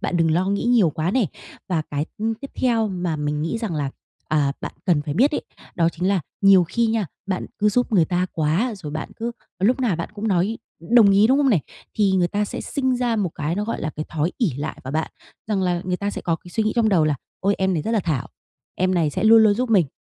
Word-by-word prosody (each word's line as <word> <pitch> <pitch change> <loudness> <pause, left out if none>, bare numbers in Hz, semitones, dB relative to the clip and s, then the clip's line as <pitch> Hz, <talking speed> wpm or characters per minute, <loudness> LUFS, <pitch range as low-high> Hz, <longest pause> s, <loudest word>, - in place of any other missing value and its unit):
Bạn 180 - -1
đừng 165 -1 +2
lo 175 +4 +1
nghĩ 200 +1 0
nhiều 235 -8 +4
quá 160 +3 -1
nè. 235 -1 +2 0.4
Và 165 -4 0
cái, 145 +2 -2
ừm, 225 +1 -1
tiếp 275 +5 -10
theo 230 -4 +1
mà 175 -4 -2
mình 150 0 -2
nghĩ 165 +8 -2
rằng 220 -8 -3
là, 145 -3 -2 0.4
à, 145 -3 +2
bạn - - -5
cần 165 -5 +3
phải 145 -1 -4
biết 260 - +4
ấy, - - -2 0.3
đó 165 -2 +2
chính 175 +2 -2
là 195 -2 +2 0.2
nhiều 195 -2 +6
khi 230 +7 0
nha, 220 -4 0 0.2
bạn 190 -2 -2
cứ 210 0 +3
giúp 245 +3 0
người 180 -6 +5
ta 180 +3 0
quá, 170 +10 0
rồi 155 -6 -7
bạn 155 - -4
cứ 235 +1 -3 0.3
lúc 235 +8 +2
nào 225 -9 +1
bạn 170 - -4
cũng 215 +1 -3
nói 195 +4 +1 0.3
đồng 230 -4 +7
ý, 200 +2 +5
đúng 265 +4 +3
không 280 -2 +3
nè? 200 - +4 0.4
Thì 200 -3 +2
người 180 -2 +2
ta 205 +2 0
sẽ - - -5
sinh 260 -3 -1
ra 245 -2 0
một 195 -6 0
cái 155 +3 -2
nó, 205 +3 -2
gọi 230 - -3
là, 155 - -2
cái 155 - -3
thói 160 +2 -1
ỷ 230 -8 +2
lại 145 +2 -5
vào 130 - -5
bạn, 160 +1 -1 0.4
rằng 205 -3 0
là 175 -1 0
người 180 0 -1
ta 200 +2 -2
sẽ - - -5
có 165 -2 0
cái 175 - -15
suy 220 +4 0
nghĩ 215 - 0
trong 230 -2 +3
đầu 180 -7 +3
là 155 -1 +2 0.3
"Ôi! 200 +1 +2
Em 190 0 +1
này 155 - -1
rất 225 - -3
là 225 -2 +2
thảo, 160 -8 -2 0.5
em 185 0 +1
này 165 -4 +2
sẽ 180 - -2
luôn 225 0 +8
luôn 210 -2 +5
giúp 245 +2 -2
mình", 185 -8 +4
190 Hz, 270 wpm, -22 LUFS, 165-220 Hz, 0.5 s, luôn